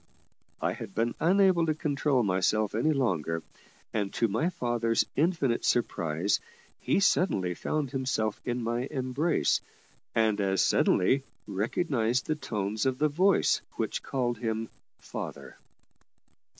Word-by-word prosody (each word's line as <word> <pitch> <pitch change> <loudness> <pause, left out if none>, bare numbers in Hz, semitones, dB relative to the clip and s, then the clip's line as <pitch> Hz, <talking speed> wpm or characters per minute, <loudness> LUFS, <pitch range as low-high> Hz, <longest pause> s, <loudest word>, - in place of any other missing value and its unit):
I - - 0
had 95 - -8
been 115 +2 +1
unable 180 0 +4
to 155 - +1
control 145 -4 +1
myself 100 +2 +1
any 120 +9 +2
longer; 85 - 0 0.5
and, 100 -3 -1
to 115 - +2
my 115 - 0
father's 120 -7 0
infinite 145 -6 +1
surprise, 90 -5 +1 0.4
he - - +1
suddenly 100 - +2
found 140 - -2
himself 130 -6 -1
in 120 -1 -2
my 120 +3 -1
embrace, 135 +5 +1 0.5
and, 110 -2 +2
as 95 -1 +2
suddenly, 130 +9 +3 0.2
recognised 115 - 0
the 155 - 0
tones 105 -5 -2
of 130 -1 0
the 150 +2 +2
voice 185 +7 +3 0.2
which - - -2
called 120 -3 -2
him 110 -1 -2 0.3
"father." - - -8
120 Hz, 125 wpm, -29 LUFS, 105-145 Hz, 0.5 s, unable